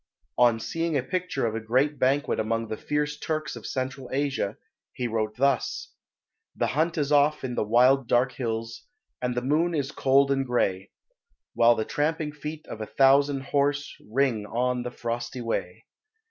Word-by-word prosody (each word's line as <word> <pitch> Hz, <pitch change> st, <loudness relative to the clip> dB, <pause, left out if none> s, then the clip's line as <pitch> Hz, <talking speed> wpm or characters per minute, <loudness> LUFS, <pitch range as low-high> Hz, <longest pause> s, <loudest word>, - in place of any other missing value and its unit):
On 120 Hz, -2 st, +5 dB
seeing 165 Hz, +5 st, -1 dB
a 130 Hz, -, -1 dB
picture 180 Hz, -4 st, -2 dB
of 110 Hz, -, -1 dB
a 115 Hz, -, -2 dB
great 130 Hz, +7 st, +1 dB
banquet 135 Hz, +3 st, +1 dB
among 115 Hz, +1 st, -1 dB
the -, -, -2 dB
fierce 150 Hz, +4 st, -2 dB
Turks 155 Hz, -3 st, -3 dB
of -, -, -8 dB
Central 130 Hz, 0 st, -4 dB
Asia, 135 Hz, -7 st, -1 dB, 0.4 s
he 125 Hz, -, -2 dB
wrote 110 Hz, -2 st, -2 dB
thus 140 Hz, +1 st, 0 dB, 0.6 s
"The -, -, 0 dB
hunt 160 Hz, +3 st, +1 dB
is 145 Hz, -1 st, 0 dB
off 145 Hz, 0 st, +3 dB
in 130 Hz, -2 st, -3 dB
the -, -, 0 dB
wild 125 Hz, +4 st, +4 dB
dark 125 Hz, +3 st, +3 dB
hills, 115 Hz, -2 st, -4 dB, 0.4 s
And 125 Hz, -1 st, -1 dB
the 125 Hz, -, -1 dB
moon 160 Hz, +6 st, +1 dB
is 140 Hz, -2 st, -1 dB
cold 135 Hz, 0 st, +3 dB
and 135 Hz, 0 st, +2 dB
gray, 100 Hz, -7 st, 0 dB, 0.6 s
While 120 Hz, 0 st, +5 dB
the 110 Hz, -, -2 dB
tramping 150 Hz, 0 st, -1 dB
feet 150 Hz, +1 st, -7 dB
of 110 Hz, -, -8 dB
a 110 Hz, -, -4 dB
thousand 140 Hz, +1 st, +4 dB
horse 145 Hz, +1 st, 0 dB
Ring 115 Hz, -4 st, +1 dB
on 125 Hz, +3 st, 0 dB
the 125 Hz, -, -4 dB
frosty 120 Hz, +1 st, -4 dB
way. 115 Hz, -3 st, -3 dB
130 Hz, 175 wpm, -26 LUFS, 115-145 Hz, 0.6 s, On